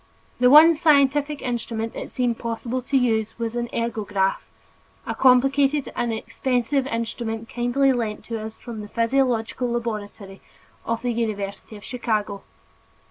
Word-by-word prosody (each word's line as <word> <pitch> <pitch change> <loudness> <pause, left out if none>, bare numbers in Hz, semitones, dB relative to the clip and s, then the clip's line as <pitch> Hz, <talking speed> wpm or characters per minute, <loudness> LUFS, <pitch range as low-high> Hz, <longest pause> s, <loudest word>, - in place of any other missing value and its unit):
The 250 0 +5
one 310 +4 +9
scientific 290 -1 +2
instrument 230 -2 -3
it - - -6
seemed 245 -2 -1
possible 235 +2 -3
to 270 +2 0
use 225 -4 0
was 230 -1 -3
an 240 0 -2
ergograph, 210 -5 -2 0.6
a - - -2
complicated 270 +2 +3
and 240 -1 -1
expensive 255 +4 -1
instrument 230 -1 -3
kindly 250 +3 +2
lent 225 -4 -3
to 230 -1 -4
us 220 0 -8
from 230 -3 -8
the 210 - -8
physiological 240 +1 0
laboratory 210 -4 -5 0.5
of 230 +1 -2
the 245 -1 0
University 215 -2 -4
of 205 - -14
Chicago. 215 -5 -2
235 Hz, 135 wpm, -23 LUFS, 220-255 Hz, 0.6 s, one